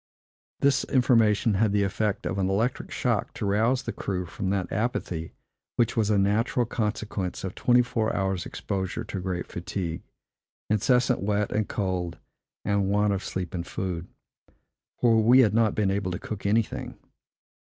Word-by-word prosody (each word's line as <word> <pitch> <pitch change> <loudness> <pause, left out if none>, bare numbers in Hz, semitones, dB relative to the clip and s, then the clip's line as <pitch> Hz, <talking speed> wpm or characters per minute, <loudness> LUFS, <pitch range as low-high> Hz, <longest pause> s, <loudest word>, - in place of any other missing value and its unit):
This 140 -1 +3
information 115 -4 +3
had 100 +1 +2
the 100 -1 +3
effect 105 +2 -1
of - - -2
an 95 -1 +1
electric 110 +6 0
shock - - -1
to - - -3
rouse 115 +6 +2
the - - -3
crew 90 -2 -3
from 95 +2 -4
that 95 -2 -1
apathy 95 -7 -2 0.4
which 120 -1 +1
was 110 -3 +2
a 105 - +3
natural 110 +5 +2
consequence 105 -4 -3
of 95 -1 -4
twenty 125 0 +4
four 110 -2 -1
hours' 95 -3 -1
exposure 95 +3 -3
to 105 -3 -5
great 90 -1 -3
fatigue, 85 -1 -4 0.7
incessant 125 +4 +3
wet 105 +1 0
and 105 -1 0
cold, 90 -4 -2 0.5
and 100 -1 +1
want 105 0 +2
of 100 - -3
sleep 90 -3 -4
and 85 -1 -4
food; 90 -3 -4 0.9
for 115 -2 +4
we 125 +4 +7
had 105 -5 +3
not 110 -2 +3
been 100 -3 +2
able 100 -1 -1
to 90 - -2
cook 100 0 -5
anything. 110 +1 0
100 Hz, 165 wpm, -26 LUFS, 95-115 Hz, 0.9 s, we